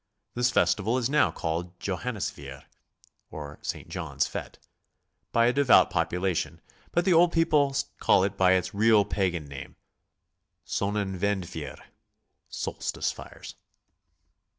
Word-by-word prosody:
This 120 +1 +2
festival 115 0 +2
is 130 +1 -1
now 150 - +4
called 85 +2 -3
Johan 105 +5 -2
nisfeier, 100 - -6 0.7
or 75 -1 -8
St. - - -5
John's - - -2
fete, - - -6 0.7
by 115 - +4
a 120 - +3
devout 140 -3 +5
population, 90 -1 -1 0.3
but 175 +1 +1
the 190 - +4
old 170 +1 +5
people 150 -5 +2 0.2
call 95 - +4
it 100 +1 -1
by 95 -1 +4
its 95 0 0
real 105 0 +4
pagan 90 -6 -1
name, 70 0 -9 0.9
Sonnenwendfeuer, 95 -5 -2 0.7
solstice - - -3
fires. - - -10
100 Hz, 120 wpm, -27 LUFS, 90-125 Hz, 0.9 s, devout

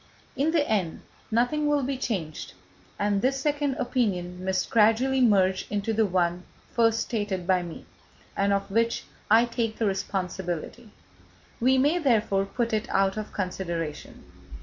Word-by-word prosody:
In 280 +4 +1
the 320 -3 +2
end, 190 -7 -1 0.3
nothing 245 +7 +1
will 295 -1 +2
be 270 +2 -1
changed, 185 - -4 0.4
and 205 -1 +1
this 270 +3 +1
second 290 -1 0
opinion 185 -9 -1
must 190 0 -1
gradually 230 +4 +3
merge 190 -5 +3
into 210 +2 -1
the 220 -1 +2
one 175 -1 0 0.3
first 230 -1 +3
stated 205 -6 -2
by 185 0 +3
me, 170 -2 -8 0.5
and 200 0 +1
of 200 0 -1
which 230 +2 +1 0.3
I 225 +3 +6
take 230 -2 -2
the 225 - 0
responsibility. 190 +2 -3 0.7
We 260 +2 +4
may, 295 +7 +3
therefore, 215 - +2
put 235 +1 -2
it 215 0 -1
out 195 0 +2
of 215 -1 -5
consideration. 170 -5 -4
215 Hz, 150 wpm, -26 LUFS, 190-245 Hz, 0.7 s, I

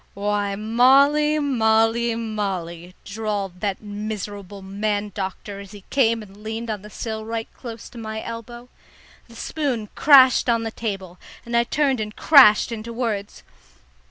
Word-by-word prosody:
"Why, 205 0 -1
Molly, 275 +8 +4
Molly, 230 -4 +2
Molly!" 185 -6 -4
drawled 200 -3 -4
that 200 0 -3
miserable 205 -2 -6
man 205 +1 -2
doctor 195 +1 -5
as 200 0 -11
he 205 -2 -12
came 230 -5 +2
and 195 -1 -15
leaned 225 +1 -4
on 210 -2 -4
the 210 - -11
sill 220 0 -5
right 225 0 -4
close 230 -3 -9
to 240 - -11
my 220 -1 -5
elbow. 235 +1 -8 0.6
The 235 - -16
spoon 250 -6 -3
crashed 265 -4 +6
on 230 -1 +2
the 225 - -4
table, 195 -6 -5 0.3
and 235 0 -3
I 235 0 +3
turned 275 -2 +1
and 215 0 -5
crashed 260 -8 +6
into 230 0 -6
words. 225 -4 -4
220 Hz, 150 wpm, -22 LUFS, 205-235 Hz, 0.6 s, crashed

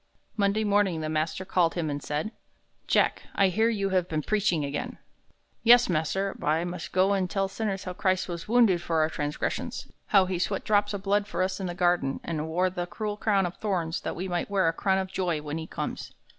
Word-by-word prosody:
Monday 205 0 +1
morning 200 -5 +2
the 155 - -3
master 155 +4 -1
called 180 -3 +2
him 170 -3 -1
and 145 -1 -3
said, 150 +10 -3 0.6
"Jack, - - +2
I 195 -1 +4
hear 220 +5 +2
you 200 -4 0
have 185 -2 +1
been 155 -1 -1
preaching 195 -7 +1
again." 140 +1 -4 0.6
"Yes, 240 0 +6
mas'r. 185 +4 0
I 155 +3 +2
must 175 -1 -5
go 190 +2 +3
an' 190 -2 +1
tell 195 +2 0
sinners 195 -1 -3
how 180 - -5
Christ 185 0 0
was 170 -2 -6
wounded 220 -6 +4
for 165 -2 0
our 155 +1 +1
transgressions, 145 0 -3 0.2
how 195 -3 +5
he 185 -1 -2
sweat 180 - -1
drops 205 -3 +2
of 195 - -6
blood 205 +1 +1
for 185 -2 -1
us 185 +1 -2
in 190 - -3
the 175 - -4
garden, 175 -6 +1
an' 155 -2 -3
wore 180 +3 +1
that 175 -1 -4
cruel 210 -2 -3
crown 205 -2 +2
of 175 - -5
thorns 175 -6 -2
that - - -4
we 185 +3 -4
might 175 +1 -2
wear 195 -4 +2
a 165 - +2
crown 190 +3 +1
of 190 -1 -2
joy 175 -5 0
when 150 +1 -4
he 160 - -6
comes." - - -5
185 Hz, 220 wpm, -27 LUFS, 165-200 Hz, 0.6 s, Yes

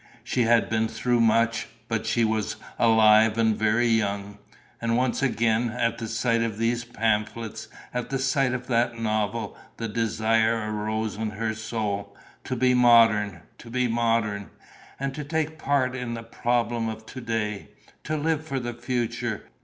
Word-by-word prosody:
She 125 -1 0
had 115 0 +4
been 110 0 +1
through 120 +2 0
much, 115 0 +2 0.2
but 115 -1 -2
she 120 +1 +2
was 110 -1 -1 0.2
alive 110 -1 +5
and 110 -1 +3
very 110 +3 +2
young. 100 -3 0 0.4
And 115 0 +1
once 125 +1 0
again, 115 -2 +1
at 115 0 -1
the 115 - -4
sight 115 +1 +1
of 115 -2 -2
those 115 +1 0
pamphlets, 110 -1 -2 0.3
at 125 -1 -3
the 135 - -1
sight 135 0 +1
of 125 0 -5
that 120 -1 +1
novel, 110 -1 -1 0.2
the 115 - -3
desire 110 0 +1
arose 110 0 -2
in 110 0 -2
her 110 +1 -2
soul: 105 -2 -4 0.3
to 130 - -2
be 125 +1 +3
modern, 115 -6 +4 0.2
to 115 - -12
be 125 +1 +1
modern! 115 -3 0 0.5
And 135 0 -2
to 150 - -5
take 160 +1 -2
part 135 -3 +1
in 125 -2 -4
the 115 - -7
problem 120 -1 -1
of 110 0 -7
to 130 - -8
day! 110 -3 -2 0.4
To 155 0 -1
live 160 +1 0
for 140 -4 -3
the 120 -1 -4
future! 120 -2 -2
115 Hz, 165 wpm, -25 LUFS, 110-120 Hz, 0.5 s, alive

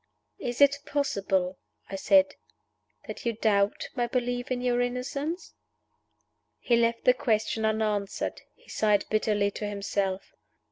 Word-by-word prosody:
"Is 245 +2 -3
it 285 0 +6
possible," 195 -10 0 0.3
I 195 - -6
said, 285 +8 +4 0.7
"that - - -7
you 235 - 0
doubt 205 -2 +1
my 240 -2 0
belief 245 0 -2
in 255 -1 -1
your 245 -1 +1
innocence?" 275 +7 -3 1.0
He 240 - +2
left 235 0 +1
the 250 - +6
question 220 -2 0
unanswered. 215 -2 -1
He - - -26
sighed 210 -2 +2
bitterly 210 -2 +1
to 210 - -4
himself. 200 -1 -2
230 Hz, 130 wpm, -28 LUFS, 205-250 Hz, 1.0 s, it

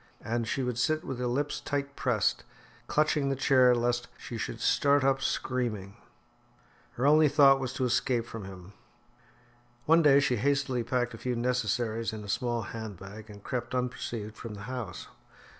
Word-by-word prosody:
And 115 +1 -1
she 135 - -1
would 125 -2 -2
sit 155 +3 +1
with 130 -2 -5
her 125 - -1
lips 140 +4 -1
tight 140 0 -3
pressed, 120 -6 0 0.4
clutching 150 -2 +1
the 135 - 0
chair 130 -2 +4
lest 120 0 0
she 120 - -8
should 115 +1 -4
start 140 +3 +3
up 135 0 +2
screaming. 115 -8 -2 1.0
Her 125 - -2
only 150 +1 +6
thought 135 -2 +6
was 130 -2 -3
to 130 -1 -1
escape 120 -1 +1
from 115 -4 -8
him. 95 0 -11 1.1
One 165 +2 +5
day 140 -3 +6
she 130 -3 +1
hastily 135 0 +1
packed 120 +1 -1
a 115 - -9
few 125 -1 -2
necessaries 115 -2 -1
in 110 -1 -6
a 100 - -9
small 120 +1 -1
hand 110 -3 -7
bag 105 +4 -11
and 100 -1 -12
crept 125 -1 -3
unperceived 120 -3 -3
from 110 -2 -8
the 100 - -9
house. 115 -5 -6
125 Hz, 175 wpm, -29 LUFS, 115-135 Hz, 1.1 s, only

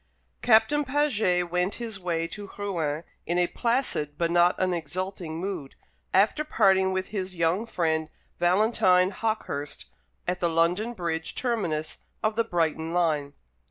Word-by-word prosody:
Captain 235 +6 +4
Paget 220 - +1
went 180 +2 0
his 225 -4 -5
way 170 -2 -1
to 205 +2 -8
Rouen 165 -7 -2 0.2
in 175 - 0
a 180 - +4
placid 230 - -1
but 170 -1 0
not 175 +1 +4
an 185 -1 +1
exulting 175 0 -4
mood, 180 -7 -5 0.4
after 210 +10 +3
parting 190 -9 +3
with 190 0 -2
his 190 -3 -4
young 170 +7 +1
friend 160 -5 0 0.3
Valentine 185 0 +4
Hawkehurst 205 -10 -3 0.4
at 180 0 -1
the 170 - +2
London 175 +8 +1
Bridge 165 -5 -3
terminus 175 -11 -2 0.2
of 215 0 +1
the 230 - +2
Brighton 165 -4 -1
line. 150 -5 +1
180 Hz, 140 wpm, -27 LUFS, 165-215 Hz, 0.4 s, Captain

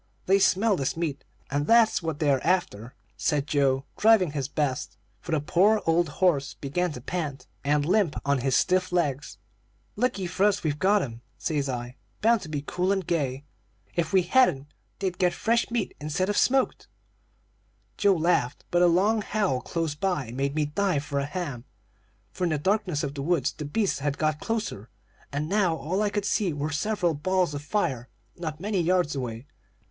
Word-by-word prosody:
They 195 +1 +4
smell 200 +2 +3
this 135 +2 -2
meat, 155 -4 -3 0.3
and 145 +1 0
that's 230 -3 +5
what 160 -3 -3
they 150 -2 +2
are 135 -2 +2
after,' 140 - -1 0.2
said 145 -2 0
Joe, 135 -2 +1
driving 210 -7 +5
his 140 -3 -2
best, 145 -3 -2 0.2
for 170 - -8
the 160 - +2
poor 190 +8 +3
old 165 0 +2
horse 145 -3 +1
began 175 +5 -2
to 125 - -8
pant, 150 -2 -4 0.2
and 145 0 +2
limp 180 -2 +2
on 140 -1 +2
his 130 0 +1
stiff 185 0 +2
legs. 145 -6 -1 0.6
"'Lucky 205 -4 0
for 185 +3 +1
us 205 0 0
we've 150 -2 -1
got 200 0 +3
'em,' 115 -2 -7 0.2
says 145 -3 -1
I, 125 0 -5 0.2
bound 230 0 +3
to 160 - -8
be 145 -2 -3
cool 180 +4 0
and 195 -3 0
gay; 140 -5 -1 0.5
'if 165 -2 -1
we 190 -2 +4
hadn't, 160 - +2 0.2
they'd 190 -2 -3
get 180 -2 +3
fresh 230 +5 +1
meat 235 -3 -2
instead 155 +6 -1
of 205 - 0
smoked.' 265 +4 +2 1.1
"Joe 200 -1 +3
laughed, 155 -6 0
but 175 - +3
a 180 - +6
long 200 +6 +3
howl 200 -12 0
close 165 +3 -2
by 150 -6 -2
made 135 +3 -2
me 155 -1 +1
dive 160 0 0
for 145 -1 -2
a 140 - -1
ham; 145 -7 -5 0.7
for 180 - -2
in - - +1
the 155 - 0
darkness 185 -1 0
of 140 -1 -3
the 140 - -5
woods 170 +4 +1
the 150 - -7
beasts 195 +5 0
had 145 0 -2
got 155 -1 0
closer, 215 - -3 0.4
and 145 +2 -2
now 190 -3 +2
all 175 +6 -2
I 210 - +2
could 205 -1 -2
see 200 -4 +1
were 145 +2 -3
several 180 +2 0
balls 180 +2 0
of 145 - -4
fire 145 - -2 0.3
not 155 -3 -5
many 200 0 -1
yards 175 -3 +1
away. 120 -2 -5
165 Hz, 190 wpm, -26 LUFS, 145-190 Hz, 1.1 s, a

